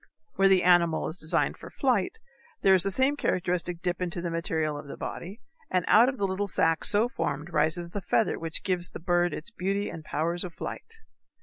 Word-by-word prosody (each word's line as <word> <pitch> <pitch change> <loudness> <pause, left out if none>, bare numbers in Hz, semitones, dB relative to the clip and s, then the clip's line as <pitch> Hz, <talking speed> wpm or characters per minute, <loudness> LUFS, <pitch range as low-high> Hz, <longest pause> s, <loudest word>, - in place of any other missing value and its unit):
Where 195 - +4
the 190 -1 +4
animal 170 -3 +3
is 160 - -8
designed 155 - -1
for - - -10
flight 245 -9 0 0.5
there 195 - +6
is 185 - +4
the 195 - 0
same 265 +8 +2
characteristic 180 -7 -1
dip 180 0 -2
into 175 -1 -1
the 170 -1 -3
material 160 -2 -1
of 145 0 -8
the - - -8
body, 195 +7 -7 0.3
and 180 -2 0
out 230 +4 +6
of 265 - -5
the 200 - 0
little 195 +1 -2
sac 165 -3 +2
so 215 +3 +5
formed 150 - -4
rises 170 +2 +2
the 205 - -4
feather 220 +4 +1
which 165 -1 -3
gives 180 -2 -1
the - - -9
bird 175 0 +1
its 235 - -6
beauty 200 0 -2
and 160 - -8
powers 170 +3 -1
of 175 -3 -7
flight. - - -7
180 Hz, 210 wpm, -27 LUFS, 165-195 Hz, 0.5 s, there